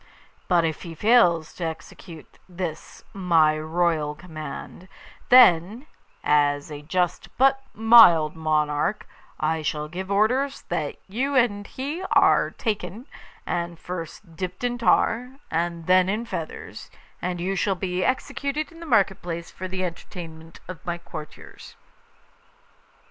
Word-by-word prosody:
But 175 -2 +3
if 160 -1 -3
he 165 -2 -8
fails 175 -6 +3
to 180 - -7
execute 160 0 -8
this 175 -3 -6
my 165 -5 +3
royal 155 -2 0
command, 160 +1 -9 0.4
then, 225 - +6 0.4
as 145 0 +2
a 145 -1 -7
just 175 +3 -1
but 270 +1 +4
mild 215 -9 +7
monarch, 155 +3 0 0.3
I 160 +1 0
shall 150 -1 -2
give 185 +4 -6
orders 250 +8 +1
that - - -2
you 260 +8 -2
and 205 -5 +2
he 290 +7 -5
are - - +4
taken, 210 0 -4 0.4
and 170 -1 -3
first 165 0 -8
dipped 185 +4 -5
in 245 0 -1
tar 245 +1 +2 0.2
and 170 0 -2
then 185 +1 +4
in 215 +4 -1
feathers, 165 -8 -7 0.3
and 180 -1 -3
you 190 +3 -1
shall 195 +1 0
be 180 0 -2
executed 280 +3 -2
in 330 - -14
the 335 - -9
market 200 -7 +2
place 170 -1 -6
for 185 - -6
the 185 0 -3
entertainment 165 -2 -9
of 185 -1 -9
my 175 -1 -3
courtiers. 155 -3 -11
180 Hz, 130 wpm, -24 LUFS, 160-220 Hz, 0.4 s, mild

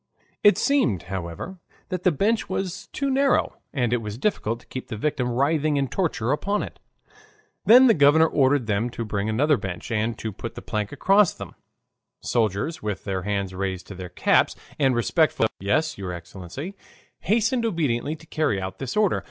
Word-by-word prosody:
It 205 - +6
seemed, 200 - +2
however, 95 - -5 0.3
that 185 -2 -3
the 180 - +3
bench 215 +8 0
was 190 -1 -3
too 275 0 -2
narrow, 275 0 +2
and 125 -5 0
it 120 - +1
was 105 0 -6
difficult 115 - -1
to - - -22
keep 130 - -7
the 110 - -5
victim 125 0 -1
writhing 145 +4 +1
in 135 -2 0
torture 150 - -1
upon 200 +7 0
it. - - -9 0.9
Then 250 +4 +8
the 235 - +6
governor 150 0 +5
ordered 140 -4 +2
them 110 +2 0
to 115 - -2
bring 105 0 -2
another 140 +6 +3
bench 95 0 -6
and 115 +1 0
to 110 - -4
put - - -8
a - - -5
plank 105 -1 -3
across 195 +6 +3
them. - - -9 0.7
Soldiers, 115 - -1
with 105 -5 -4
their 95 -2 -2
hands 100 -1 -2
raised 95 -1 -3
to - - -6
their 90 -1 -7
caps, - - +2 0.2
and 135 -3 +3
respectful 155 +4 +2
murmurs 110 - +2
of 95 - -11
"Yes, 155 +7 +1
your 90 -2 -4
Excellency," 90 - -8 0.5
hasten 230 +3 +1
obediently 155 - 0
to 160 - -16
carry 155 -11 0
out 95 0 -6
this 135 - -4
order. 210 -3 +3
130 Hz, 185 wpm, -24 LUFS, 105-170 Hz, 0.9 s, Then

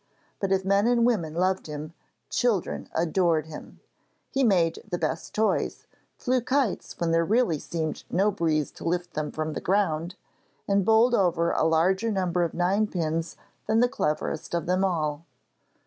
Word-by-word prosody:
But 195 -1 -1
if 190 0 +1
men 200 +3 +3
and 240 -1 +3
women 170 -10 0
loved 185 +1 0
him, 150 +1 -6 0.4
children 230 -7 0
adored 165 -1 +2
him. 160 -1 -11 0.5
He 270 - +1
made 175 -8 +2
the 175 - -1
best 160 -1 -3
toys, 220 0 0 0.3
flew 255 -1 +1
kites 260 -3 -1
when 170 -1 0
there 165 0 +3
really 210 -4 +2
seemed 160 0 -4
no 195 +4 +2
breeze 160 -6 0
to - - -12
lift 175 +1 -2
them 155 -1 -3
from 155 0 -3
the - - -4
ground, 180 -3 0 0.5
and 200 0 +2
bowled 225 +4 +4
over 175 -5 +2
a - - +1
larger 185 +7 +2
number 180 -3 0
of 170 -2 -1
ninepins 175 -3 0 0.3
than 220 +1 +3
the 245 - +5
cleverest 155 -5 -2
of 170 - -1
them 185 +2 +1
all. 160 -5 -1
180 Hz, 165 wpm, -26 LUFS, 160-205 Hz, 0.5 s, the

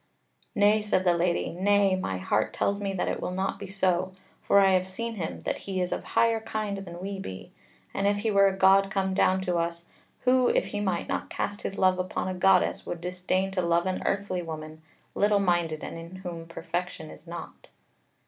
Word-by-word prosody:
"Nay," 210 +1 +4
said 210 -3 +1
the 175 -2 +4
Lady, 170 0 0
"Nay; 195 +2 +3
my 95 - -2
heart 90 - 0
tells 200 0 0
me 200 -1 -1
that 185 - -1
it - - -2
will - - -2
not 190 +1 -2
be 200 - -7
so; 185 -1 0 0.3
for - - +3
I 195 -1 +5
have 185 0 +2
seen 230 +5 -4
him, 180 -7 -5
that - - -2
he 190 -1 -1
is 180 0 -1
of - - -2
higher 230 -1 +2
kind 215 -2 -3
than 175 -3 -8
we 195 +1 -5
be; 95 - -8 0.4
as 195 - -1
if 205 0 +2
he 220 - +1
were 200 -1 +5
a 190 0 -1
god 195 +1 +5
come 190 -1 0
down 185 0 +3
to 180 -2 0
us, 170 0 -2 0.4
who 255 0 +4
if - - +2
he 205 - -4
might 190 -4 -1
not - - -3
cast 205 0 -3
his 195 - -4
love 185 -1 +3
upon 185 0 -2
a 185 - -2
goddess, 185 0 +3
would 175 - -5
disdain 185 +2 -1
to 190 -1 0
love 170 0 +2
an 185 0 -1
earthly 195 -2 -1
woman, 155 -1 -7 0.3
little 205 0 +3
minded 175 -5 0
and 165 - -6
in 170 +2 -10
whom 175 -3 -7
perfection 165 -1 -5
is - - -14
not." 170 +1 -9
185 Hz, 215 wpm, -27 LUFS, 175-200 Hz, 0.4 s, I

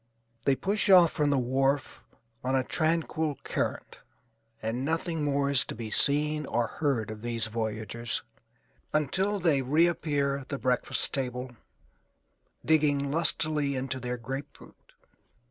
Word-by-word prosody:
They 140 - +3
push 200 +10 -1
off 180 -4 +7
from 150 -1 0
the 140 - +2
wharf 135 +2 0 0.4
on 130 +1 0
a 130 - +2
tranquil 160 -1 -1
current - - -3 0.6
and 115 +4 -3
nothing 160 +1 -2
more 140 -1 +1
is 140 - +5
to - - -6
be 110 -1 -7
seen 150 +3 +3
or 120 0 0
heard 120 -5 -2
of 105 -1 -9
these 115 -1 -1
voyagers 110 +1 -3 0.7
until 190 +8 +1
they 165 -7 +2
reappear 145 -1 +1
at 135 -1 -11
the 140 - -3
breakfast 125 -2 +2
table, 125 -2 -3 1.1
digging 145 -3 +2
lustily 155 -3 +2
into 130 0 -3
their 125 0 -4
grapefruit. 135 +4 -9
140 Hz, 130 wpm, -28 LUFS, 125-155 Hz, 1.1 s, off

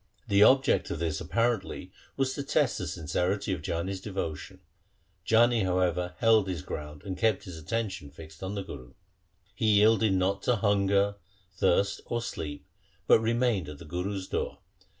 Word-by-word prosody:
The 100 0 +3
object 135 +5 +5
of 85 - -3
this 80 -1 -2
apparently 110 -1 -1 0.3
was 135 -1 +1
to - - -4
test 140 -1 +1
the 95 - -3
sincerity 90 +4 -1
of 85 - -4
Jani's 90 +4 -3
devotion. 95 -7 -5 0.7
Jani, 115 +1 +4
however, 90 -1 0
held 110 -3 +4
his 90 -6 -4
ground 75 -1 -7
and 95 -2 -4
kept 110 +1 +1
his 90 - -8
attention 95 -3 -3
fixed 80 +2 -13
on 95 +2 -4
the 100 - -3
Guru. 65 -9 -10 0.6
He 105 +1 +2
yielded 110 0 +4
not 95 +1 +1
to 125 - +2
hunger, 100 -1 +2 0.3
thirst, 100 +1 +1
or 120 - -1
sleep, 80 -11 -6 0.4
but - - +6
remained 115 - 0
at 75 - -8
the 85 - -12
Guru's 95 +4 -4
door. - - -3
95 Hz, 160 wpm, -28 LUFS, 85-110 Hz, 0.7 s, but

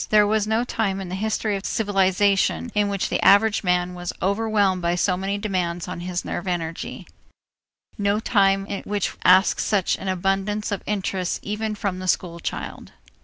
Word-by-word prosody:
There 210 -1 +5
was 215 0 +1
no 220 +2 +1
time 210 -5 -1
in 190 -2 -6
the - - -6
history 215 +1 -1
of 195 - -5
civilization 200 +2 +1
in 210 -1 +1
which 200 -1 -1
the - - -1
average 205 +2 +5
man 180 -1 +1
was 175 -1 -5
overwhelmed 200 -1 +1
by 170 0 +1
so 180 +1 +1
many 195 +2 -2
demands 180 -4 -2
on 180 -1 -5
his 180 0 -4
nerve 190 - -4
energy, 165 -2 -4 0.9
no 200 +1 +1
time 195 -3 +2 0.2
which 205 -2 -1
asked 185 +2 +5
such 200 -4 +1
an - - -6
abundance 195 +3 -1
of 200 - -2
interests 190 -3 -2
even 210 +1 -3
from 200 -3 -3
the 185 - -5
school 170 -2 0
child. - - -6
195 Hz, 170 wpm, -23 LUFS, 180-210 Hz, 0.9 s, There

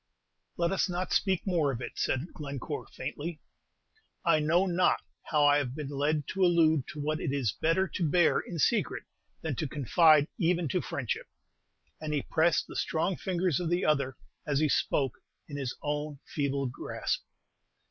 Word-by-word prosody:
"Let 170 +1 +1
us 195 0 +1
not 180 +1 -2
speak 190 -4 +1
more 165 -7 +2
of 120 - -4
it," 120 - -5
said 130 +7 -1
Glencore, 140 -4 -5
faintly. 155 +1 -5 0.9
"I 165 -2 +5
know 165 +5 +3
not 180 -1 +2 0.2
how 150 -1 +3
I 145 0 +6
have 130 -3 -3
been 150 -3 -5
led 145 +1 0
to 195 - 0
allude 160 -5 +4
to 150 - -8
what 155 +2 -1
it 150 - -2
is 135 -7 0
better 165 - +1
to 170 -4 -1
bear 175 +2 +4
in 175 - -6
secret 150 - +1 0.4
than 160 -4 -2
to 155 - -1
confide 150 +2 +4
even 170 -2 +2
to - - 0
friendship;" - - -3 0.7
and 150 -1 -2
he 140 - 0
pressed 165 +1 +2
the - - -11
strong 170 +4 0
fingers 180 -4 0
of 175 -2 -2
the 175 +1 +1
other 140 -4 +1 0.3
as 145 -2 0
he 155 +1 +2
spoke, 135 -2 +1 0.3
in 145 - -7
his 135 -3 -4
own 150 0 -2
feeble 140 -2 -1
grasp. 130 0 -3
155 Hz, 175 wpm, -30 LUFS, 140-170 Hz, 0.9 s, I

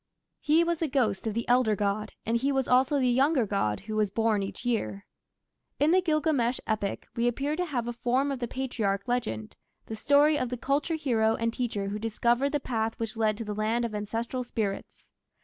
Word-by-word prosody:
He 315 +2 +3
was 340 -1 -1
the 325 - 0
ghost 235 -7 0
of 215 - -2
the 235 - -2
elder 245 -3 +3
god, 205 +1 -2
and 230 - 0
he 270 +4 +1
was 270 -2 0
also 260 +3 +3
the 255 - +2
younger 265 +1 +3
god 190 - -1
who 215 +2 -6
was 215 -2 +2
born 220 0 +1
each 195 +5 -6
year. 220 -4 -1 0.7
In 295 +3 +4
the 370 +1 +5
Gilgamesh 305 -7 +1
epic 210 -2 -2
we 235 +1 +1
appear 280 +5 -1
to 360 +2 -1
have 250 -8 -3
a 240 - -2
form 250 +4 0
of 270 - -3
the 240 - -2
patriarch 220 -7 -2
legend 110 - -2 0.3
the 220 - -6
story 290 +5 +4
of 255 - -1
the 250 - -3
"culture 285 +7 0
hero" 225 -7 +1
and 230 0 -1
teacher 215 -6 -2
who 210 +1 -4
discovered 235 +4 +1
the 295 - 0
path 225 -4 -2
which 225 0 -3
led 215 -2 +1
to 230 - -5
the 210 - -3
land 220 +3 0
of 230 - -4
ancestral 225 +4 -3
spirits. 215 -5 -5
235 Hz, 210 wpm, -28 LUFS, 215-270 Hz, 0.7 s, the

